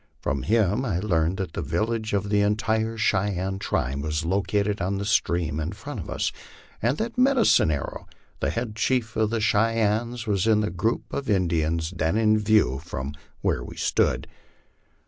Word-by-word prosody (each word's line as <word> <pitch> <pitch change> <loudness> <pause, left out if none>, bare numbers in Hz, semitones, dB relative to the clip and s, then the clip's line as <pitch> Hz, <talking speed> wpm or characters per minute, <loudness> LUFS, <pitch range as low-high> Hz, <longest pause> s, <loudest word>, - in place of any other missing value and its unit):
From 70 0 -2
him 105 - +2
I 100 -10 -1
learned 90 -2 +1
that 95 -4 -4
the - - -3
village 110 0 -1
of 100 0 0
the 105 0 +3
entire 110 +2 0
Cheyenne 95 -2 0
tribe 70 -6 -1
was 75 +2 -2
located 100 +3 0
on 95 +3 -1
the 100 - -3
streams 85 -7 +1
in 80 +5 -3
front - - -7
of - - -7
us, - - -1 0.5
and 120 +6 +1
that 230 +2 -3
Medicine 255 - +4
Arrow, 70 -4 -3 0.3
the - - 0
head 115 -2 -3
chief 115 0 0
of 110 -1 +2
the 115 0 -1
Cheyennes, 110 +2 +1
was 100 -1 +1
in 110 -1 +4
the 105 - -1
group 105 +6 -2
of 140 -3 -3
In 95 -4 +2
dians 80 +1 -1
then 80 +4 +1
in 110 -1 +4
view 105 - +3
from 70 -4 -5 0.3
where - - 0
we - - -10
stood. - - +1
105 Hz, 180 wpm, -25 LUFS, 85-110 Hz, 0.5 s, Medicine